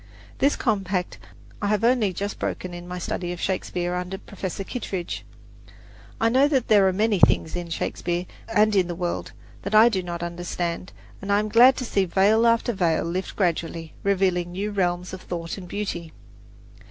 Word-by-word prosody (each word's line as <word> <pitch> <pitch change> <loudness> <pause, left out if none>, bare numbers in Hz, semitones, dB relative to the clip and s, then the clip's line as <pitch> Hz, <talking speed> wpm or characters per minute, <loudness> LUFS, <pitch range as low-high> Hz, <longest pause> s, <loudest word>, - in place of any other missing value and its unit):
This 280 +2 +3
compact 195 -5 -1 0.4
I 205 - 0
have 210 +1 +1
only 235 -4 +3
just 200 +3 -4
broken 180 -1 -3
in 175 0 -8
my 180 0 -5
study 175 0 -3
of 175 - -6
Shakespeare 180 -2 -2
under 180 +1 -3
Professor 195 -1 -6
Kittredge. 190 -5 -4 1.0
I 225 - +3
know 260 +5 +4
there 220 -9 +4
are - - +3
many 210 +1 +1
things 160 - +3
in 175 -1 -4
Shakespeare, 175 +1 -2 0.2
and 215 0 +3
in 185 -3 +3
the 175 - -4
world, 175 0 -3 0.3
that 200 +2 -2
I 220 +2 +8
do 195 -5 -1
not 175 -1 -5
understand; 175 0 -4 0.3
and 195 +1 -3
I 200 - +5
am 215 +1 0
glad 245 +4 +7
to 255 - -3
see 195 -4 +1
veil 205 +6 +4
after 230 +1 +2
veil 170 -5 +1
lift 180 +3 -3
gradually, 165 -3 -1
revealing 185 -3 +1
new 200 +3 -2
realms 180 -2 -1
of 185 - -7
thought 170 -1 -5
and 180 - -9
beauty. 175 -5 -4
190 Hz, 175 wpm, -24 LUFS, 175-210 Hz, 1.0 s, I